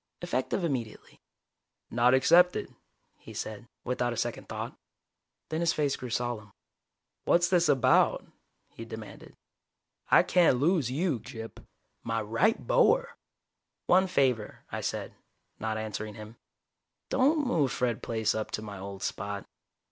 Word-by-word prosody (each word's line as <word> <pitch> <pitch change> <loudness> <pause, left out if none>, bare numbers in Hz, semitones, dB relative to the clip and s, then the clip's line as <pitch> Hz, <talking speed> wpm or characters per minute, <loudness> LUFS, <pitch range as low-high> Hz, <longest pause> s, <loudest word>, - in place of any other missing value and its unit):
"Effective 175 +2 -1
immediately." 130 -9 -4 0.7
"Not 125 +2 +4
accepted," 175 +7 +4 0.5
he - - -12
said, 110 +2 -6 0.2
without 125 -1 -1
a - - -7
second 120 +1 -3
thought. - - -5 0.7
Then 160 - -2
his 170 -1 +2
face 145 -2 0
grew 125 - -7
solemn. 115 -3 -3 0.7
"What's 175 +1 +3
this 180 -2 +3
about?" 135 -4 +3 0.4
he - - -10
demanded. - - -10 0.7
"I - - +7
can't 170 -8 +4
lose 155 -3 +2
you, 150 0 0
Gyp. 115 +1 -9 0.4
My 115 0 -2
right 115 - +1
bower!" - - +3 0.7
"One 190 +1 +4
favor," 130 - 0
I - - -3
said, - - -4 0.5
not 110 0 -2
answering 110 -1 -5
him. 110 +1 -10 0.7
"Don't 290 +3 +3
move 150 - +1
Fred 125 -4 -1
Plaice 110 -2 0
up 110 -1 -3
to 110 - -8
my 100 -3 -7
old 100 0 -7
spot. 100 0 -4
125 Hz, 135 wpm, -29 LUFS, 110-170 Hz, 0.7 s, I